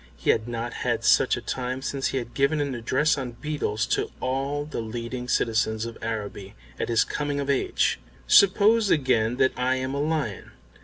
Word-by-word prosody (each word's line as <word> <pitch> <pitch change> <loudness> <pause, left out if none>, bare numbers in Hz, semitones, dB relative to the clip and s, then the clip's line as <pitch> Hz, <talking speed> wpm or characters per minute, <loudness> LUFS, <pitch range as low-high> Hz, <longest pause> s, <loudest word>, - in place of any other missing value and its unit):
He - - +2
had 110 +1 -1
not 120 0 -4
had - - 0
such - - +4
a - - -5
time 130 +1 -4
since 135 0 -1
he - - -2
had 120 -2 -5
given 140 +3 +1
an 140 -2 -1
address 130 +6 +1
on 125 -3 -5
Beetles 120 -6 -2
to - - 0
all 135 +3 -2
the 150 -5 -4
leading 120 +2 -5
citizens 110 -2 +1
of 115 -1 -7
Araby 105 -3 -5 0.2
at - - -2
his 115 -2 +4
coming 145 -1 -3
of 140 0 0
age. 135 - +1 0.3
"Suppose 205 - +5
again 125 -5 +2
that 130 - +3
I 130 +1 +1
am 130 +1 -3
a 140 - -1
lion. 150 -10 -2
130 Hz, 190 wpm, -25 LUFS, 115-140 Hz, 0.3 s, Suppose